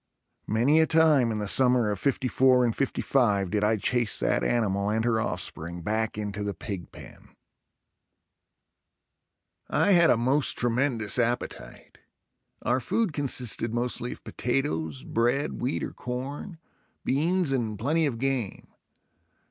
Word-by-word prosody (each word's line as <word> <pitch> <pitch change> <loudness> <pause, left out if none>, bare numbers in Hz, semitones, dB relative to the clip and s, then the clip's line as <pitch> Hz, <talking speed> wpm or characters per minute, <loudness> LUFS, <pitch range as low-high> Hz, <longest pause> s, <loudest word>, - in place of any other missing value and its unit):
Many 125 +9 +3
a 160 - +4
time 155 -7 +4
in 110 - -2
the 105 -1 -3
summer 125 -1 +3
of 100 - -4
'54 130 -1 +2
and 115 - -1
'55 105 -8 0
did 105 0 0
I 110 +1 +2
chase 120 0 0
that - - 0
animal 100 -4 0
and 110 +2 0
her 115 -2 +1
offspring 85 -3 -4
back 110 +3 -2
into 105 -1 -4
the 100 -1 -3
pig 100 -7 -7
pen. - - -14 2.3
I - - +2
had 170 -3 +5
a - - +4
most 130 +5 +3
tremendous 120 -2 0
appetite. 120 +1 -4 0.6
Our 125 +2 +1
food 190 - -1
consisted 125 -5 0
mostly 120 0 -2
of - - -16
potatoes, 80 - -2
bread, 120 +5 -1
wheat 125 +3 -2
or - - -5
corn, 135 +8 -6 0.5
beans 165 +4 +1
and 115 -5 -1
plenty 155 +8 +1
of 125 -5 -3
game. 130 -5 -3
120 Hz, 135 wpm, -26 LUFS, 110-135 Hz, 2.3 s, had